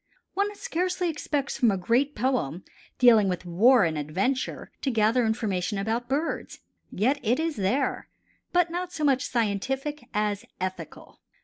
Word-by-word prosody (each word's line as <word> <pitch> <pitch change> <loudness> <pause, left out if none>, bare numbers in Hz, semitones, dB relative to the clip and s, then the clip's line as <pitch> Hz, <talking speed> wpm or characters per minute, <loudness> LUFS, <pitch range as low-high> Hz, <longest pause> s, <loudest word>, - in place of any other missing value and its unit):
One 405 +1 -1
scarcely 365 -5 -1
expects 290 -2 -2
from 240 -4 +5
a 195 - +1
great 245 +10 +1
poem, 210 - -1 0.3
dealing 225 -5 +6
with 180 0 -3
war 215 +7 +5
and 160 -3 0
adventure, 190 - -2
to 275 - 0
gather 225 +1 +3
information 210 -3 -1
about 225 +5 -2
birds. 295 +5 -2 0.3
Yet 260 +9 +1
it 240 +4 +1
is 325 -1 -1
there, 240 +7 -1 0.4
but 350 -1 +2
not 355 +1 -3
so 320 -5 -4
much 270 -3 +3
scientific 265 +6 -2
as 210 -2 -1 0.2
ethical. 185 0 -6
245 Hz, 145 wpm, -26 LUFS, 200-290 Hz, 0.4 s, dealing